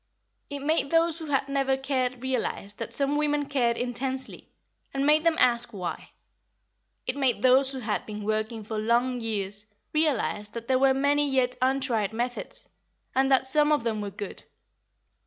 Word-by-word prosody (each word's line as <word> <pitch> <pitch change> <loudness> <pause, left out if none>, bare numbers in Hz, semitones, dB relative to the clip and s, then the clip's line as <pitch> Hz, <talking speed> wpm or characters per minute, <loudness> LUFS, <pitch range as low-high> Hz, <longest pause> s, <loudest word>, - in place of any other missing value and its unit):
It 285 -1 -5
made 295 0 +1
those 330 +1 +2
who 320 - -7
had 275 -2 +1
never 275 -1 +1
cared 255 -2 -1
realise 250 -5 -2
that 215 - -6
some 280 +4 +1
women 295 -1 +1
cared 240 -4 +1
intensely, 260 +2 -4 0.5
and 275 0 +1
made 305 +1 +4
them 335 -1 +3
ask 240 -1 +3
why. 185 -4 -5 1.0
It 255 - -1
made 265 -4 0
those 260 +1 +6
who 265 -1 -5
had 215 -2 -2
been 210 -1 -6
working 215 +1 -2
for 215 +1 -4
long 240 +3 +1
years 205 -2 -2 0.3
realise 275 -9 0
that 235 +1 -7
there 260 -1 +3
were 265 0 +4
many 285 +1 +2
yet 255 -2 +1
untried 255 -6 +1
methods, 245 +2 -4 0.5
and 265 +1 +3
that 265 -1 +4
some 295 +3 +4
of 295 -5 +2
them 220 -2 -1
were 205 - -3
good. 200 0 -6
260 Hz, 170 wpm, -27 LUFS, 230-275 Hz, 1.0 s, those